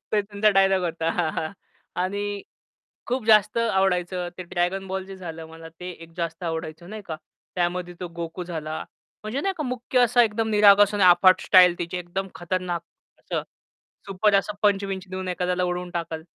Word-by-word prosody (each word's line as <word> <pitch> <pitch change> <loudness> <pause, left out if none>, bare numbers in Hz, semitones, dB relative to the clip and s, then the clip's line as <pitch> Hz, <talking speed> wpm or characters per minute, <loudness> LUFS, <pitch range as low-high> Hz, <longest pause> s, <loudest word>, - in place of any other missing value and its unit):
ते 210 - +4
तुमचा 205 +1 +2
डायलॉग 195 -1 +3
होता. 165 0 -1 0.4
आणि 200 +2 -2 0.6
खूप 250 -1 -2
जास्त 215 0 +5
आवडायचं 185 -5 +1
ते - - -4
Dragon 180 +2 -1
Ball 190 0 -3
Z - - -18
जे 195 -1 -9
झालं, 165 -3 -8
मला 165 0 -11
ते 180 0 -5
एक 165 -1 -12
जास्त 170 0 -4
आवडायचं 160 +2 -5
नाही 215 -1 -7
का? 160 -2 -4 0.4
त्यामध्ये 175 0 -1
तो 180 - -4
गोकू 170 +2 -5
झाला. 160 -3 -5 0.4
म्हणजे 215 +6 -3
नाही 390 +3 -1
का 305 - -2
मुख्य 250 0 -1
असा 245 0 +5
एकदम 220 0 0
निरागस 205 -1 +6
आणि 205 - +1
अफाट 185 +1 +6
स्टाईल 180 -2 +6
त्याची, 175 +1 -4
एकदम 180 +2 -4
खतरनाक 175 0 -3 0.4
असं, - - -3 0.6
सुपर 200 +2 +1
असं, 200 +1 +2
पंच 200 -1 +3
विंच 190 -1 -5
देऊन 185 0 -4
एखाद्याला 180 0 0
उडवून 180 0 -3
टाकल. 165 -2 -4
185 Hz, 170 wpm, -24 LUFS, 175-205 Hz, 0.6 s, निरागस